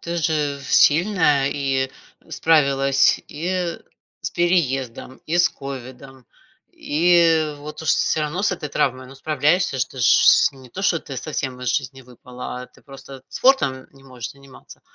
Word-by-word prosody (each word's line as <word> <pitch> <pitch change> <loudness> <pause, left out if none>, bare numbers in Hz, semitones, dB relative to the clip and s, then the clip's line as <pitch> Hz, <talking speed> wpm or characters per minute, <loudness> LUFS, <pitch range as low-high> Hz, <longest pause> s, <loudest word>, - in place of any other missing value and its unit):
ты 170 0 -5
же 150 -4 -1
сильная 150 -1 +3
и 135 -2 -1 0.4
справилась, 140 -4 +2
и 175 +2 -3 0.5
с - - -2
переездом, 135 -8 -1
и 165 - -1
с 175 - +4
ковидом, 135 -1 -10 0.5
и 165 -1 +2
вот 150 +2 -9
уж 160 - -5
всё 155 - +2
равно 150 +5 -3
с 205 - +1
этой 150 -4 -7
травмой, 130 -2 -1
но 135 - -13
справляешься 150 +2 0
ж. 130 - +2
Ты 130 - -14
ж 120 - 0
с - - +5
не 130 -2 -15
то 190 - -7
что 185 - +2
ты 135 -3 -9
совсем 130 -2 -4
из 125 - -3
жизни 135 -1 -5
выпала, 125 0 -9
а - - -10
ты - - -24
просто 135 -1 -12
спортом 140 - +1
не 135 - -20
можешь 125 -4 -8
заниматься. 140 -1 -16
140 Hz, 160 wpm, -21 LUFS, 130-160 Hz, 0.5 s, с